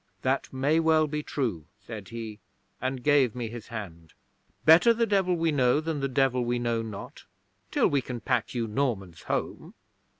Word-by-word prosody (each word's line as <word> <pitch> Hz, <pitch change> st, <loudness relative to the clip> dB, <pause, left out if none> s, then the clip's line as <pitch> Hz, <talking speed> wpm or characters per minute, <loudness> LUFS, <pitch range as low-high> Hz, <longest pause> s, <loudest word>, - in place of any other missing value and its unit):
"That 130 Hz, +1 st, 0 dB
may 140 Hz, +5 st, +2 dB
well 160 Hz, -1 st, +4 dB
be 150 Hz, 0 st, -3 dB
true," 115 Hz, -, -3 dB
said 105 Hz, -1 st, -9 dB
he, 115 Hz, -2 st, -7 dB, 0.4 s
and 130 Hz, 0 st, -2 dB
gave 140 Hz, -6 st, +3 dB
me 120 Hz, -2 st, -3 dB
his 115 Hz, -1 st, -8 dB
hand. 85 Hz, -8 st, -8 dB, 0.5 s
"Better 175 Hz, +9 st, +7 dB
the 230 Hz, 0 st, +2 dB
devil 195 Hz, -4 st, +2 dB
we 165 Hz, -1 st, +1 dB
know 130 Hz, -1 st, +3 dB
than 160 Hz, -1 st, -3 dB
the 135 Hz, -, 0 dB
devil 130 Hz, -1 st, +1 dB
we 120 Hz, +1 st, 0 dB
know 120 Hz, -1 st, 0 dB
not, 110 Hz, -3 st, -8 dB, 0.4 s
till -, -, +3 dB
we 140 Hz, -2 st, +1 dB
can 125 Hz, -1 st, -6 dB
pack 125 Hz, 0 st, -1 dB
you 120 Hz, -1 st, 0 dB
Normans 105 Hz, -8 st, -2 dB
home." -, -, -4 dB
125 Hz, 175 wpm, -27 LUFS, 115-150 Hz, 0.5 s, Better